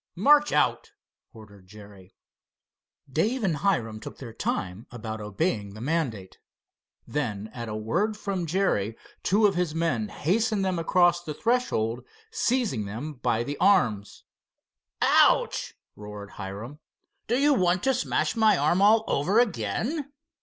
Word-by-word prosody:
"March 295 +10 +5
out," - - +1 0.4
ordered 100 -4 -15
Jerry. 100 -2 -15 0.9
Dave 215 - 0
and 175 -6 +1
Hiram 120 - 0
took - - -9
their 120 -4 -9
time 95 -1 -3
about 110 -2 -6
obeying 105 - -2
the - - -9
mandate. 125 - -3 0.7
Then 110 -7 -3
at 115 -2 -6
a 105 - -4
word 175 - -1
from 195 -5 -3
Jerry 130 - 0 0.2
two 210 +3 +3
of 200 - +4
his 175 -3 -1
men 160 -10 0
hastened 210 +4 0
them 185 -2 -1
across 175 +1 +3
the 150 -3 -6
threshold, 130 - 0 0.3
seizing 245 - 0
them 120 +10 -6
by 120 -3 -1
the 145 +3 -5
arms. 120 - +2 0.8
"Ouch!" - - +3 0.2
roared 105 -1 -9
Hiram. 105 +8 -8 0.5
"Do 240 - +1
you 290 +2 +4
want 180 -6 +1
to 265 - +3
smash 250 -1 -1
my 220 -3 +4
arm 165 +6 +2
all 215 +2 +5
over 185 +11 +2
again?" 240 - -1
150 Hz, 140 wpm, -26 LUFS, -, 0.9 s, March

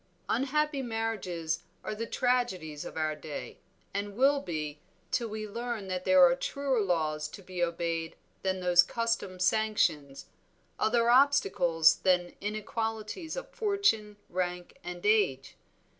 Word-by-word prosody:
"Unhappy 280 +4 +1
marriages 210 -9 -2 0.2
are - - -3
the 230 +2 -4
tragedies 190 - -1
of - - -8
our 155 -1 0
day, 150 -1 -7 0.3
and 200 +1 -3
will 280 +2 +4
be, 155 - -4 0.3
till 235 - 0
we 215 0 -5
learn 230 -2 -4
that 185 0 -3
there 185 -1 +7
are 175 - +5
truer 270 +5 -1
laws 155 -5 0
to 195 +6 -11
be 180 -1 -3
obeyed 165 -1 -2 0.3
than 190 -1 -1
those 180 -1 +6
custom 230 -2 -2
sanctions, 180 -8 +1 0.5
other 235 +1 +3
obstacles 195 - +4
than 180 -2 +1
inequalities 220 - -3
of - - -6
fortune, 400 - +1
rank, 180 0 -3
and 175 +1 -7
age. 200 -12 +2
195 Hz, 130 wpm, -30 LUFS, 175-230 Hz, 0.5 s, there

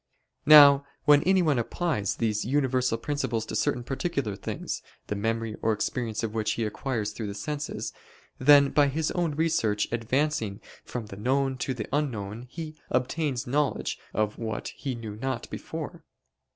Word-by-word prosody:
Now 145 -2 +9 0.2
when 145 -1 +7
anyone 175 -8 +3
applies 120 - -1
these 110 -2 0
universal 130 -2 +1
principles 135 -6 -2
to - - -5
certain 125 - 0
particular 135 - -2
things, - - -4 0.2
the 105 - -3
memory 115 +1 -2
or 110 - +2
experience 115 +1 -2
of 110 -1 -2
which 110 -1 0
he 115 - -2
acquires 110 -1 -2
through 105 0 -5
the 100 - -5
senses; 145 +7 -4 0.5
then 140 +1 +7
by 145 -1 +4
his 155 +3 -1
own 170 -4 -1
research 115 -10 +1
advancing 115 -2 0 0.2
from 120 -3 -5
the 100 -2 -10
known 135 +4 +1
to 130 0 -2
the 110 -3 -4
unknown, 120 -5 -2
he 155 +1 -7
obtains 130 0 0
knowledge 140 +2 0
of 105 0 -1
what 110 -2 -3
he 135 -3 -5
knew 110 -3 -7
not 130 0 -3
before. - - -6
125 Hz, 155 wpm, -27 LUFS, 110-145 Hz, 0.5 s, Now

